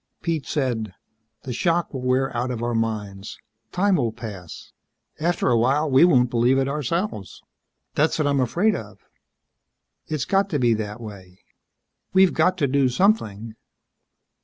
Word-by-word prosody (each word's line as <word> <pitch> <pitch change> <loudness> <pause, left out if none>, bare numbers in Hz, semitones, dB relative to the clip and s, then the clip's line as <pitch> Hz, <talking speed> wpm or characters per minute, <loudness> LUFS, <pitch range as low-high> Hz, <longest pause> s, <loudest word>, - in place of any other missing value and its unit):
Pete 165 -4 -2
said, 115 -9 -2 0.5
"The 130 - -5
shock 170 +6 0
will 130 - -4
wear 130 +1 0
out 120 +2 -1
of 120 -2 -4
our 120 0 -1
minds. 105 -3 -3 0.3
Time 195 0 +2
will 120 -6 0
pass. 105 -7 -9 0.5
After 170 -3 0
a 120 - +4
while, 140 +5 +1
we 135 +6 +7
won't 125 -8 +3
believe 120 +2 +3
it 135 0 +1
ourselves." 150 - -3 0.5
"That's 155 +2 +1
what 155 - 0
I'm 140 -1 +1
afraid 175 - +1
of." 105 -1 -8 1.1
"It's 150 -4 -2
got 195 0 +1
to 150 - 0
be 120 -2 +3
that 105 0 -4
way." 95 -5 -11 0.7
"We've 190 -1 +5
got 180 +4 +2
to 145 -5 +1
do 135 -1 +2
something." 115 - 0
130 Hz, 155 wpm, -23 LUFS, 115-155 Hz, 1.1 s, we